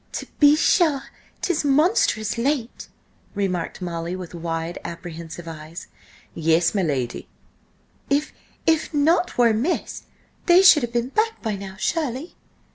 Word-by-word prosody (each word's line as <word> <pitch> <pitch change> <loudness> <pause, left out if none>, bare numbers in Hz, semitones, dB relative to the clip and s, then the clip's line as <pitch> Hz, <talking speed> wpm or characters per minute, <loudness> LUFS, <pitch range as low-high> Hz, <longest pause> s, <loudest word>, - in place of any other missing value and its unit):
"To - - -4
be 290 0 +7
sure, 310 -3 +3 0.4
'tis 355 -4 0
monstrous 285 - +2
late!" 245 0 -2 0.5
remarked 185 -2 -2
Molly, 170 0 -4
with 180 -2 -8
wide, 165 0 -4
apprehensive 170 0 -8
eyes. 160 +1 -8 0.5
"Yes, 165 +1 +2
my 200 - +1
lady." 130 -8 -2 0.8
"If–if 305 +2 -1
nought 330 +5 +2
were 240 -1 +5
amiss, 235 +11 -2 0.4
they 355 +2 +7
should 345 -5 +8
have 240 -1 -3
been 240 +1 0
back 445 +8 0
by 220 -3 -1
now, 195 -1 -8
surely?" 295 - -2
225 Hz, 125 wpm, -23 LUFS, -, 0.8 s, should